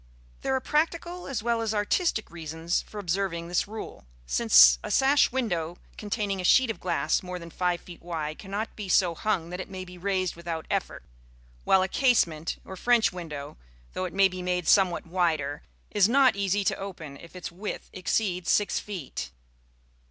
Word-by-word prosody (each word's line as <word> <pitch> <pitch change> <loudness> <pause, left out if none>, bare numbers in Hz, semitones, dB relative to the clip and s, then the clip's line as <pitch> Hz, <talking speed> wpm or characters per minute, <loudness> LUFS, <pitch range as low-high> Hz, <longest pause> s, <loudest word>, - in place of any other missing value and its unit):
There 265 - 0
are - - +1
practical 335 +5 -1
as 245 -6 -3
well 235 -1 +1
as 220 -1 -1
artistic 220 - 0
reasons 165 0 -2
for 215 - -12
observing 175 -3 -2
this 175 - +1
rule, 210 - -8 0.2
since - - +6
a - - -5
sash 275 +1 +4
window 175 -10 -2 0.2
containing 205 -2 -2
a - - -6
sheet 255 +6 +5
of - - -9
glass - - 0
more 180 -1 -6
than 170 -1 -10
five 180 -1 0
feet 175 -2 -12
wide 155 -3 -4
cannot 205 +3 -4
be 205 -3 -6
so 180 -2 +4
hung 175 -2 -1
that 180 - -5
it - - -6
may 185 -1 -6
be 180 0 -12
raised 185 -1 -1
without 165 -1 -5
effort; - - -2 0.6
while 190 -1 +5
a - - 0
casement, 175 - +1
or 190 - -8
French 225 -2 +3
window, 150 - -7 0.4
though 185 - -2
it 180 - -6
may 195 0 +6
be 185 -1 -7
made 180 -2 -1
somewhat 185 -4 +4
wider, 160 -5 0 0.3
is 205 -1 +4
not 265 -1 +5
easy 200 0 0
to - - 0
open 170 -7 -7
if 170 +4 -14
its 180 - -6
width 195 +5 -6
exceeds 185 -1 -1
six 205 - +2
feet. 175 - -6
185 Hz, 180 wpm, -27 LUFS, 170-210 Hz, 0.6 s, since